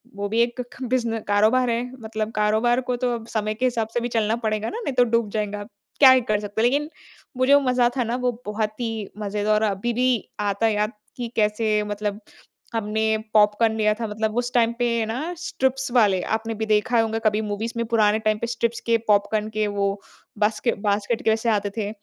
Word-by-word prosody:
वो 205 Hz, 0 st, -3 dB
भी 225 Hz, +2 st, 0 dB
एक 240 Hz, +1 st, 0 dB
ख -, -, -15 dB
बिज़ने 235 Hz, -3 st, 0 dB
कारोबार 220 Hz, +5 st, +3 dB
है 235 Hz, 0 st, 0 dB, 0.2 s
मतलब 220 Hz, 0 st, -4 dB
कारोबार 220 Hz, +4 st, +2 dB
को 250 Hz, -, +2 dB
तो 245 Hz, -, +2 dB
अब 225 Hz, -1 st, -8 dB
समय 215 Hz, -2 st, -2 dB
के 250 Hz, +4 st, -1 dB
हिसाब 235 Hz, -3 st, 0 dB
से -, -, +1 dB
भी 240 Hz, -, -2 dB
चलना 225 Hz, -2 st, 0 dB
पड़ेगा 215 Hz, 0 st, -1 dB
ना 455 Hz, -, -5 dB
नहीं 275 Hz, -, -1 dB
तो 245 Hz, -, +5 dB
डूब 230 Hz, -3 st, +2 dB
जाएँगा। 210 Hz, -1 st, -3 dB, 0.4 s
क्या 270 Hz, -2 st, +9 dB
ही 260 Hz, 0 st, +5 dB
कर 210 Hz, -, +2 dB
सकते 205 Hz, +1 st, -3 dB
हैं 240 Hz, -, +5 dB
लेकिन 290 Hz, +3 st, -1 dB, 0.5 s
वो 255 Hz, -, +2 dB
जो 285 Hz, +1 st, +6 dB
मज़ा 250 Hz, -2 st, +2 dB
था 250 Hz, -, +2 dB
ना 235 Hz, +2 st, -2 dB
वो 245 Hz, -, +3 dB
बहुत 215 Hz, +1 st, -3 dB
ही 225 Hz, -3 st, -3 dB
मज़ेदार 210 Hz, 0 st, -1 dB
और 215 Hz, -, +1 dB
अभी 215 Hz, +5 st, -2 dB
भी 255 Hz, +2 st, +2 dB, 0.3 s
आता 205 Hz, +1 st, 0 dB
है 220 Hz, -, +3 dB
याद 210 Hz, +1 st, 0 dB, 0.3 s
कि 245 Hz, -, -3 dB
कैसे 210 Hz, 0 st, +1 dB
मतलब 205 Hz, 0 st, -3 dB, 0.5 s
हमने 220 Hz, 0 st, 0 dB, 0.2 s
पॉपकॉर्न 215 Hz, +1 st, +4 dB
लिया 215 Hz, -1 st, +3 dB
था 230 Hz, -, -4 dB
मतलब 215 Hz, +1 st, -2 dB
उस 245 Hz, 0 st, -1 dB
टाइम 235 Hz, -1 st, +3 dB
पे 235 Hz, -2 st, +1 dB
ना 265 Hz, +11 st, -3 dB
स्ट्रिप्स 265 Hz, -6 st, -1 dB
वाले 205 Hz, -6 st, +4 dB
आपने 225 Hz, +1 st, -4 dB
भी 220 Hz, +1 st, -2 dB
देखा 220 Hz, +3 st, +2 dB
होंगा 225 Hz, 0 st, -1 dB
कभी 215 Hz, 0 st, +2 dB
मूवीज़ 215 Hz, +2 st, -3 dB
में 235 Hz, -, 0 dB
पुराने 215 Hz, -2 st, +3 dB
टाइम 215 Hz, 0 st, +2 dB
पे 235 Hz, -, -2 dB
स्ट्रिप्स 235 Hz, 0 st, -1 dB
के 230 Hz, -, +4 dB
पॉपकॉर्न 210 Hz, +1 st, +2 dB
के 215 Hz, 0 st, -1 dB
वो 200 Hz, -1 st, 0 dB, 0.5 s
बास्के 215 Hz, +3 st, +1 dB
बास्केट 205 Hz, +3 st, 0 dB
के -, -, +2 dB
वैसे 225 Hz, +1 st, 0 dB
आते 205 Hz, -2 st, +1 dB
थे, 205 Hz, -2 st, -1 dB
220 Hz, 220 wpm, -23 LUFS, 210-240 Hz, 0.5 s, क्या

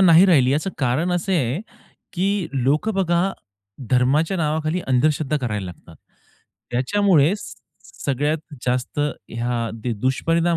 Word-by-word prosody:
नाही 175 Hz, -1 st, +7 dB
राहिली 130 Hz, -7 st, +5 dB
याचं 155 Hz, +6 st, 0 dB
कारण 140 Hz, +7 st, +1 dB
असे 180 Hz, +1 st, 0 dB
आहे 135 Hz, -, 0 dB, 0.5 s
की 190 Hz, +2 st, 0 dB, 0.2 s
लोकं 145 Hz, -, +1 dB
बघा 185 Hz, 0 st, +1 dB, 0.6 s
धर्माच्या 140 Hz, +8 st, +2 dB
नावाखाली 155 Hz, +1 st, 0 dB
अंधश्रद्धा 150 Hz, +3 st, +2 dB
करायला 105 Hz, -7 st, -3 dB
लागतात. 85 Hz, -2 st, -12 dB, 0.7 s
त्याच्यामुळे 165 Hz, +5 st, +3 dB
स 210 Hz, -, -9 dB, 0.5 s
सगळ्यात 145 Hz, +3 st, 0 dB, 0.3 s
जास्त 125 Hz, +3 st, -1 dB
ह्या 120 Hz, -4 st, -2 dB
दे 115 Hz, +1 st, -3 dB
दुष्परिणाम 165 Hz, +7 st, +1 dB
150 Hz, 120 wpm, -22 LUFS, 125-170 Hz, 0.7 s, नाही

